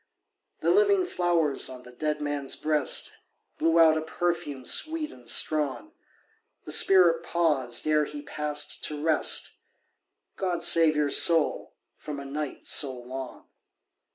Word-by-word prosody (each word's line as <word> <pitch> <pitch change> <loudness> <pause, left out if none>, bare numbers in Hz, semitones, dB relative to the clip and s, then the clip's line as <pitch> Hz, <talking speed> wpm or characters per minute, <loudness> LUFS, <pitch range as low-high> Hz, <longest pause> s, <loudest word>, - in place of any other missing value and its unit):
The - - +1
living 400 -1 +3
flowers 170 - 0
on 125 -1 -10
the 125 - -14
dead 150 +4 -3
man's 145 -2 -3
breast 150 -3 -1 0.4
Blew 165 +1 +1
out 160 -1 +5
a - - -2
perfume 160 -5 -4
sweet 315 -1 0
and 120 -2 -11
strong. 155 - -1 0.7
The - - -5
spirit 175 -4 +5
paused 150 -8 -1
ere 155 -1 +1
he 290 - -9
passed 150 - -4
to 150 -1 -5
rest— 160 -2 +1 0.9
"God 175 -3 -3
save 165 -2 +5
your 150 -1 0
soul 165 -3 +2 0.2
from 145 -2 -8
a 140 - -9
night 145 +1 -6
so 140 -3 +2
long." 130 +1 -9
155 Hz, 135 wpm, -26 LUFS, 140-170 Hz, 0.9 s, out